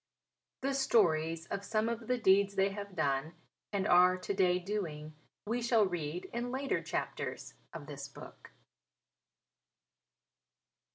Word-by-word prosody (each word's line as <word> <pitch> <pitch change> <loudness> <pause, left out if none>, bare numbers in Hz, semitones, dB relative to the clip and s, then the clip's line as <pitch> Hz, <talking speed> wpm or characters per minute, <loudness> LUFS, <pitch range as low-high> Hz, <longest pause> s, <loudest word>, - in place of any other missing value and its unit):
The 275 +1 0
stories 165 -11 +2
of 200 - -4
some 215 +2 0
of 230 -1 -3
the 250 - +1
deeds 200 -2 +4
they 195 +1 +3
have 200 -1 -7
done 145 0 0 0.4
and 200 -1 0
are 180 +1 +6
to 185 - -3
day 180 -2 +3
doing, 175 -6 -4 0.3
we 235 +3 -1
shall 230 -3 +4
read 175 -2 -3
in 240 +1 -2
later 265 +2 -1
chapters - - -4 0.2
in 155 -3 -7
this 140 -1 -7
book. 140 - -13
195 Hz, 130 wpm, -33 LUFS, 165-220 Hz, 0.4 s, are